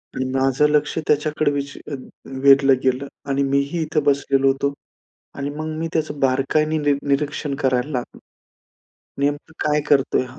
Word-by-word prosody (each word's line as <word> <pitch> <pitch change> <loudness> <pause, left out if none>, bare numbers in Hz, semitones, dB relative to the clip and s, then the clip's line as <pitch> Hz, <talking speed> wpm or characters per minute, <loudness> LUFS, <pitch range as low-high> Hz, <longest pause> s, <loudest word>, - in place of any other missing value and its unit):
आणि 130 - -1
माझं 135 +2 +2
लक्ष 150 +2 +1
त्याच्याकडे 150 0 +1
विच 140 0 -4 0.7
वेधलं 135 0 +6
गेलं 130 +2 0 0.2
आणि 140 +1 +1
मीही 140 +4 0
इथे 155 0 0
बसलेलो 135 -1 +2
होतो 140 +1 -1 0.6
आणि 140 +1 -3
मग 155 0 -4
मी 165 +1 -2
त्याचं 155 -2 -2
बारकाईने 140 +4 +1
नि 145 -1 +2
निरीक्षण 140 0 -1
करायला 130 0 0
लागलो. 125 -2 -5 1.0
नेमकं 145 +3 -1 0.2
काय 150 0 +2
करतोय 140 -2 +3
हा? 130 +3 -13
140 Hz, 145 wpm, -21 LUFS, 135-150 Hz, 1.0 s, वेधलं